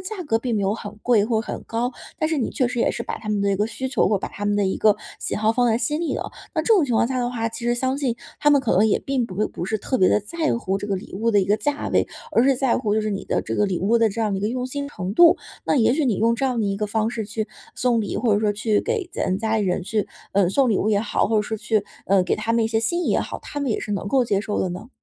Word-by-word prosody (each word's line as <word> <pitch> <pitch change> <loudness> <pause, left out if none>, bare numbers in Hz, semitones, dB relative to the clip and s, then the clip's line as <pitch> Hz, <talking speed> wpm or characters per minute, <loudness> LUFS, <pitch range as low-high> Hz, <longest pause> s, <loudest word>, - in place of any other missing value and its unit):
价 370 -3 -5
格 225 -5 +1
并 235 -3 -1
没 200 - 0
有 195 +2 +1
很 210 -1 -8
贵 225 -4 +4
或 220 -1 +1
很 - - -6
高， 240 +2 -1 0.3
但 310 - +1
是 320 - 0
你 250 - -1
确 255 - +1
实 240 -1 -2
也 - - +3
是 - - -5
把 - - -4
他 215 - -9
们 210 -1 0
的 200 - +1
一 - - 0
个 210 - +1
需 260 +3 -4
求 260 - +2
或 210 - +2
者 - - -2
把 - - -4
他 205 - -7
们 205 0 +1
的 200 -2 +2
一 190 - -1
个 210 -1 +4 0.2
喜 - - -2
好 220 +1 +2
放 245 0 +2
在 225 +1 +2
心 295 +7 -1
里 340 - -1
了。 - - -4 0.2
那 - - +2
这 455 - +4
种 350 -7 +4
情 250 - -2
况 225 - +3
下 260 0 -2
的 245 0 -1
话， 230 -2 -2
其 230 +1 -8
实 240 0 +2
相 260 +2 0
信 255 -5 -1 0.2
他 295 - +4
们 285 -2 +5
可 240 - 0
能 205 - +5
也 - - +2
并 265 -3 -1
不 185 -5 -8
会 215 - +1
不 - - -6
是 215 +3 -1
特 260 - -1
别 185 - +5
地 - - +4
在 310 +7 -1
乎 195 -4 -1
这 205 - -6
个 195 - 0
礼 185 - -9
物 230 +4 +1
的 205 -2 +4
一 - - +1
个 205 +3 +2
价 290 +3 -2
位， - - +2 0.2
而 230 - +4
是 270 -1 +4
在 260 -2 +2
乎 210 -4 -1
就 220 - +2
是 215 0 -2
你 195 - -5
的 - - -1
这 - - -4
个 210 - +2
礼 185 -3 -1
物 220 +6 +2
的 225 -1 +4
这 220 +3 -4
样 210 -3 0
一 - - -3
个 210 - 0
用 250 +1 -2
心 280 +2 -4
程 185 -7 -5
度。 340 +5 +7 0.3
那 - - +2
也 240 -1 +4
许 305 +1 +1
你 230 - +2
用 230 +2 +2
这 270 - -2
样 250 -3 -1
的 205 - 0
一 195 - -1
个 210 +1 -1
方 220 +2 0
式 225 -3 -4
去 215 +1 -3 0.3
送 245 -2 +1
礼， 205 - -3
或 235 -4 +2
者 205 - +1
说 210 -1 +2
去 215 0 +1
给 440 -5 -2
咱 185 - -1
家 220 0 0
里 - - +1
人 180 -1 0
去， 210 +2 -1 0.2
嗯， 195 -3 +3
送 265 +3 +3
礼 205 - +2
物 215 - 0
也 205 -2 +3
好， 210 - 0
或 225 - +2
者 210 - +3
说 220 +1 -4
去， 210 -1 0 0.2
呃， 195 -1 +4
给 - - +1
他 230 - -1
们 230 -1 +2
一 220 - 0
些 225 0 +1
心 345 +10 0
意 - - -1
也 - - +2
好， - - -5
他 290 - -6
们 275 - -1
也 - - 0
是 210 - -4
能 200 0 -2
够 260 0 +3
接 200 -3 +1
受 210 -1 -3
的 185 - -1
呢？ 185 +7 -7
225 Hz, 365 characters per minute, -23 LUFS, 205-250 Hz, 0.3 s, 度